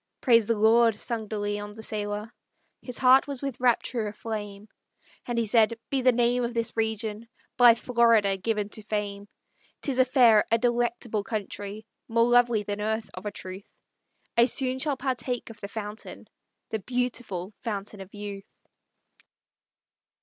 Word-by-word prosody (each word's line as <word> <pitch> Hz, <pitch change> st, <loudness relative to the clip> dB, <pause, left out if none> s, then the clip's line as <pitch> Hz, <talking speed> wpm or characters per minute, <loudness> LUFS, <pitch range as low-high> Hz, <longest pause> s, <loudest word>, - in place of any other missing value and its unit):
"Praise 230 Hz, -4 st, +4 dB
the 230 Hz, -, +1 dB
Lord!" 225 Hz, 0 st, +4 dB
sung 230 Hz, -3 st, -3 dB
De 215 Hz, -, -4 dB
Leon, 205 Hz, 0 st, -3 dB
the 220 Hz, +1 st, -10 dB
sailor; 210 Hz, +1 st, -4 dB, 0.5 s
His 250 Hz, -2 st, -5 dB
heart 260 Hz, +1 st, +5 dB
was 280 Hz, -2 st, -5 dB
with 275 Hz, -3 st, -4 dB
rapture 240 Hz, -2 st, +1 dB
aflame; 210 Hz, -1 st, -6 dB, 0.6 s
And 240 Hz, -1 st, -2 dB
he 230 Hz, -, +2 dB
said: 225 Hz, +1 st, +3 dB
"Be 270 Hz, -1 st, +1 dB
the 255 Hz, 0 st, +5 dB
name 245 Hz, +1 st, +2 dB
of 235 Hz, 0 st, -3 dB
this 230 Hz, -1 st, -1 dB
region 220 Hz, 0 st, -2 dB, 0.3 s
By 240 Hz, -1 st, +7 dB
Florida 230 Hz, -5 st, +3 dB
given 210 Hz, +1 st, -2 dB
to 215 Hz, -, -6 dB
fame. 205 Hz, -1 st, -4 dB, 0.6 s
'Tis 265 Hz, -3 st, 0 dB
a 255 Hz, -, +6 dB
fair, 240 Hz, -5 st, +5 dB
a 230 Hz, -, +4 dB
delectable 240 Hz, -2 st, 0 dB
country. 205 Hz, 0 st, -5 dB, 0.2 s
More 230 Hz, 0 st, +3 dB
lovely 240 Hz, -3 st, +4 dB
than 205 Hz, 0 st, -4 dB
earth, 220 Hz, +1 st, -2 dB
of 185 Hz, +3 st, -7 dB
a -, -, -3 dB
truth; 190 Hz, -1 st, -9 dB, 0.6 s
I 235 Hz, -, +6 dB
soon 260 Hz, -1 st, 0 dB
shall 285 Hz, 0 st, 0 dB
partake 250 Hz, -2 st, -3 dB
of 220 Hz, -, -15 dB
the 200 Hz, -, -5 dB
fountain, 210 Hz, +1 st, -7 dB, 0.4 s
The 220 Hz, -, -1 dB
beautiful 230 Hz, -5 st, -3 dB
Fountain 205 Hz, -3 st, -5 dB
of 190 Hz, 0 st, -11 dB
Youth!" 205 Hz, -1 st, -8 dB
225 Hz, 155 wpm, -27 LUFS, 210-240 Hz, 0.6 s, By